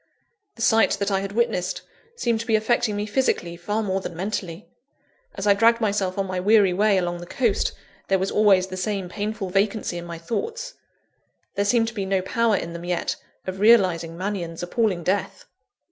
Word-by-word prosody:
The 230 - -4
sight 225 -1 +4
that 200 0 -1
I 195 - +2
had 195 0 -5
witnessed, 210 -6 -1 0.3
seemed 235 - 0
to 230 - -6
be 225 - +3
affecting 220 0 +1
me 205 0 -2
physically, 205 -7 0
far 205 +6 -2
more 190 -1 -1
than 175 - -6
mentally. 185 -3 -4 0.7
As - - -4
I 205 - +6
dragged 230 +3 +4
myself 200 -4 0
on 195 - 0
my 185 -1 -3
weary 200 -1 +4
way 205 +1 +3
along 175 -1 -1
the 175 - -9
coast, 235 0 0 0.3
there 195 - +3
was 190 +1 -2
always 200 -3 +4
the 185 0 -7
same 190 -1 -2
painful 205 0 -4
vacancy 200 -2 0
in 170 - -8
my 170 -1 -7
thoughts: 455 - -4 0.8
there 200 - 0
seemed 225 +2 +3
to - - -12
be 200 -4 -3
no 190 -1 +1
power 230 +2 +1
in 170 -1 -5
them 170 0 -7
yet, 175 -1 -1 0.3
of 185 0 -5
realising 185 -7 +4
Mannion's 180 -3 -4
appalling 185 -2 0
death. 190 +4 -2
200 Hz, 190 wpm, -24 LUFS, 180-220 Hz, 0.8 s, I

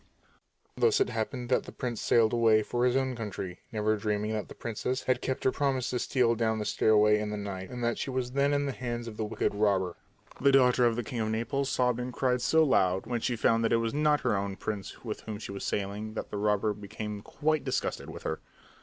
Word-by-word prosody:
Thus 440 -2 +3
it 400 - +2
happened 120 +2 -3
that 130 - +2
the - - -8
prince 120 -3 -4
sailed 115 -1 +3
away 110 -2 +4
for 120 +3 0
his 125 - +1
own 130 -1 +1
country, 100 -5 -5
never 110 -1 +1
dreaming 105 0 -1
that 105 -2 -3
the - - -11
princess 125 +3 -3
had 130 -1 +1
kept 130 - -2
her 130 - +3
promise 135 -3 0
to 125 - -1
steal 125 -3 +2
down 110 -1 0
the 105 - -3
stairway 105 0 +4
in 105 0 -2
the 105 - -3
night 95 -2 -5
and 125 -1 -5
that 120 0 0
she - - -3
was 130 -1 -2
then 140 +2 +2
in 145 0 +1
the 140 - -1
hands 120 -2 -4
of 110 - -7
the 110 - -1
wicked 105 -1 -1
robber. 100 -4 +1 0.5
The 140 +1 +5
daughter 125 -2 +5
of 115 - +1
the 120 - -2
king 120 +2 -5
of 110 -1 0
Naples 130 +5 -1
sobbed 125 -2 +1
and 125 +1 -3
cried 125 -1 0
so 160 +5 +4
loud 95 -10 +2
when 120 -2 -2
she 120 +1 0
found 115 +1 +2
that 115 - +1
it - - +5
was 115 0 -1
not 150 0 +2
her - - +1
own 100 0 -2
prince 105 +3 -6
with 110 - -4
whom 110 -2 -6
she 105 - -7
was 100 - -6
sailing 105 +2 -3
that - - -5
the 105 - -3
robber 105 0 +1
became 105 0 -6
quite 155 +6 -1
disgusted 130 -2 -2
with - - -9
her. - - -2
115 Hz, 240 wpm, -29 LUFS, 105-125 Hz, 0.5 s, The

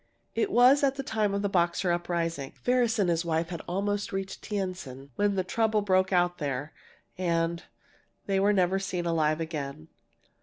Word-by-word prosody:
"It 415 - 0
was 260 +2 +6
at 275 -1 +3
the 275 - -4
time 215 -5 0
of 200 - -1
the - - +2
Boxer 175 -1 +1
uprising. 170 -4 -2
Ferris 245 -2 +2
and 200 -4 +2
his 170 -1 +1
wife 165 0 -1
had 170 -2 -5
almost 205 +4 -1
reached 195 0 -4
Tientsin 180 -10 -5
when 205 -1 +1
the 185 - +1
trouble 215 +2 +1
broke 185 -1 +2
out 175 -1 +2
there, 145 0 -3 0.5
and 170 -1 0 0.6
they 195 -1 +1
were 200 +2 +4
never 190 -1 +2
seen 180 -2 -3
alive 155 -2 +1
again!" 140 - -5
180 Hz, 175 wpm, -28 LUFS, 165-205 Hz, 0.6 s, was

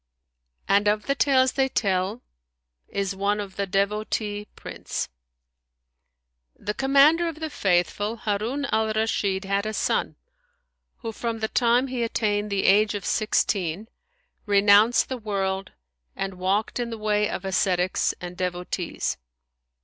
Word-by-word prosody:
And 200 +1 +3
of 210 +1 +1
the 275 - +1
tales 260 -2 +3
they 270 -1 +1
tell 195 0 -1 0.6
is 200 -1 -2
one 200 +2 0
of 195 -2 -6
THE 200 0 -2
DEVOTEE 205 +2 -1
PRINCE - - -5 1.5
The 210 - -4
Commander 280 +7 +4
of 320 -2 -5
the 315 -1 -4
Faithful, 195 +3 0
Harun 230 +5 -2
al 220 0 +1
Rashid, 205 -3 0
had 200 +2 0
a 215 - -3
son - - 0 0.9
who, 225 -2 -4
from 230 +1 -3
the 220 0 -1
time 240 +2 +3
he 255 -2 -3
attained 210 -2 0
the 200 -1 0
age 210 +2 +4
of 200 - -5
sixteen, 200 -2 0 0.6
renounced 205 +3 +5
the 260 -1 -4
world 195 -3 -2 0.4
and 195 0 -3
walked 200 +6 0
in 240 -1 -2
the 225 - -5
way[FN#158] 210 -1 0
of 190 - -7
ascetics 185 -1 +1
and 175 0 -7
devotees. 180 -1 -3
210 Hz, 135 wpm, -25 LUFS, 195-230 Hz, 1.5 s, renounced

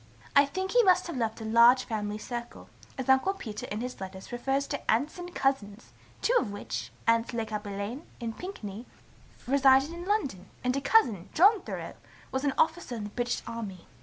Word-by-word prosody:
I 280 0 +7
think 375 +5 -3
he - - +6
must 370 -4 +4
have 340 - -5
left 225 -2 -2
a - - -5
large 235 +3 +6
family 210 -3 -3
circle, 240 +2 -7 0.3
as 265 - -4
Uncle 265 +9 +4
Peter 215 - -6
in 210 +2 -4
his 250 -4 -6
letters 190 +2 -8
refers 270 +3 0
to 285 - -3
aunts 285 +10 0
and 355 0 -8
cousins, 235 -5 -1 0.3
two 485 - +3
of 205 - -3
which, 205 - -5
aunts 230 +1 +2
Le 230 -1 -1
Cappelain 210 +5 -5
and 230 -2 -4
Pinkney, 235 - -7 0.6
resided 270 +3 +4
in 345 +1 -7
London, 280 - -1 0.2
and 250 +1 +1
a 275 - -1
cousin, 235 - +3
John 400 +4 +6
Thoreau, - - -6 0.4
was 265 +1 -1
an 280 -2 +1
officer 320 -6 +1
in 220 - -5
the 205 - -5
British 245 +2 -2
army. 215 -6 -6
245 Hz, 190 wpm, -29 LUFS, 220-290 Hz, 0.6 s, I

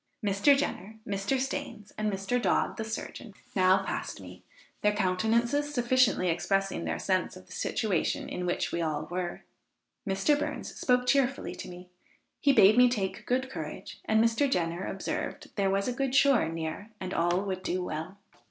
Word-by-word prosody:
Mr. 205 +8 +4
Jenner, 220 -7 -3
Mr. 200 +6 0
Stains 265 -5 -4
and 215 0 -1
Mr. 195 +6 -1
Dodd - - +1
the 220 - -2
surgeon, 220 -1 -6 0.2
now 190 0 +4
passed - - -4
me, - - -11 0.4
their 210 0 +3
countenances 225 +9 +1
sufficiently 245 -6 +3
expressing 195 +4 0
their - - -1
sense 185 -1 0
of 185 - -14
the 185 - -20
situation 195 -2 -1
in 180 0 -4
which 175 - -1
we 170 - -1
all 155 -2 -1
were. 180 -1 -3 0.7
Mr. 195 +10 +2
Burns - - -4
spoke 250 -1 +2
cheerfully 270 +1 +1
to - - -8
me; 180 0 -10 0.5
he 280 - +4
bade 215 -2 +6
me 250 0 +7
take 200 -6 -3
good 260 +1 +1
courage, - - -7
and 220 0 +3
Mr. 230 +5 +2
Jenner 175 -4 -1
observed, 195 - -4
there 195 -2 +1
was 195 +1 0
a 250 - 0
good 270 +1 -1
shore 270 - +5
near, 165 +5 -5
and 185 0 -4
all 175 +2 +2
would 190 -2 -3
do 185 0 -2
well. 160 +4 -5
200 Hz, 170 wpm, -29 LUFS, 185-245 Hz, 0.7 s, me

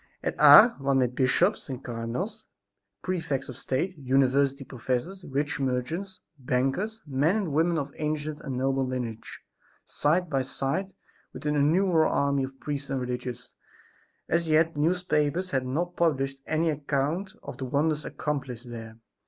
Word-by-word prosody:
At - - -1
Ars 240 - +10
one 135 0 +1
met 125 -2 +2
bishops 140 +10 +2
and 130 0 -5
cardinals, 125 - -4 0.6
prefects 165 -8 -2
of 130 - -6
state, 155 +10 -2
university 135 +1 +2
professors, 130 +10 -3
rich 145 0 -2
merchants, 140 +9 -2 0.2
bankers, 135 - -1
men 145 +6 +1
and 195 -7 -2
women 165 +3 +2
of 140 -2 -3
ancient 150 0 -2
and 130 -2 -5
noble 135 +1 +1
lineage, 125 -4 -5 0.4
side 175 +5 +1
by 135 -4 0
side 140 +9 -2 0.4
with - - -9
an 150 0 +1
innumerable 160 +3 +3
army 140 -1 +1
of 135 0 -7
priests 145 -1 -4
and 135 -1 -1
religious. 125 0 -5 0.7
As 165 0 0
yet 160 +1 +4
the 145 - -6
newspapers 170 +1 +1
had 130 -1 0
not 175 +7 -2
published 135 -5 0
any 160 +1 +1
account 150 +6 -2
of - - -8
the 130 - -3
wonders 150 +3 0
accomplished 130 -5 -4
there. 115 -1 -8
140 Hz, 150 wpm, -27 LUFS, 130-165 Hz, 0.7 s, Ars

